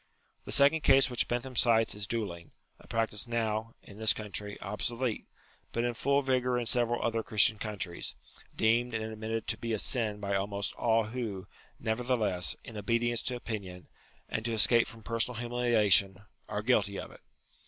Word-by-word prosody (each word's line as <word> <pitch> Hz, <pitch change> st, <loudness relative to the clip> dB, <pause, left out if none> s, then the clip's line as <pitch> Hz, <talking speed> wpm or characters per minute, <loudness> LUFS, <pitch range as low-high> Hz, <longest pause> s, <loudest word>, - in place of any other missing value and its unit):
The -, -, -6 dB
second 145 Hz, +3 st, +4 dB
case 135 Hz, -2 st, +5 dB
which 125 Hz, -, 0 dB
Bentham 125 Hz, +2 st, -3 dB
cites 115 Hz, -1 st, +3 dB
is 105 Hz, 0 st, -4 dB
duelling; 95 Hz, -8 st, -4 dB, 0.3 s
a -, -, -18 dB
practice 115 Hz, -1 st, -1 dB
now, 115 Hz, -1 st, -2 dB
in 100 Hz, +1 st, -13 dB
this 110 Hz, -1 st, +4 dB
country, 105 Hz, -1 st, -4 dB
obsolete, 115 Hz, +4 st, -3 dB, 0.4 s
but 115 Hz, -, -1 dB
in 120 Hz, 0 st, 0 dB
full 140 Hz, +4 st, +1 dB
vigour 125 Hz, -1 st, +1 dB
in 120 Hz, -, -2 dB
several 120 Hz, 0 st, +1 dB
other 115 Hz, -1 st, 0 dB
Christian 110 Hz, -1 st, +3 dB
countries; 100 Hz, -5 st, -3 dB, 0.4 s
deemed 115 Hz, +2 st, +2 dB
and 110 Hz, -, -2 dB
admitted 110 Hz, 0 st, -4 dB
to 110 Hz, -, -2 dB
be 115 Hz, 0 st, -3 dB
a -, -, +1 dB
sin 110 Hz, -2 st, +2 dB
by 100 Hz, -1 st, -2 dB
almost 100 Hz, +1 st, -2 dB
all 115 Hz, -1 st, +2 dB
who, 110 Hz, -4 st, -5 dB, 0.3 s
nevertheless, 110 Hz, -5 st, 0 dB
in 115 Hz, -3 st, -9 dB
obedience 115 Hz, +3 st, 0 dB
to 125 Hz, -, -2 dB
opinion, 100 Hz, -7 st, -6 dB, 0.4 s
and 110 Hz, -, -3 dB
to 115 Hz, -, -1 dB
escape 115 Hz, +2 st, +4 dB
from 115 Hz, -1 st, -11 dB
personal 115 Hz, +1 st, -1 dB
humiliation, 110 Hz, -6 st, +2 dB, 0.3 s
are -, -, -3 dB
guilty -, -, +2 dB
of -, -, -7 dB
it. -, -, -16 dB
115 Hz, 170 wpm, -30 LUFS, 105-120 Hz, 0.4 s, case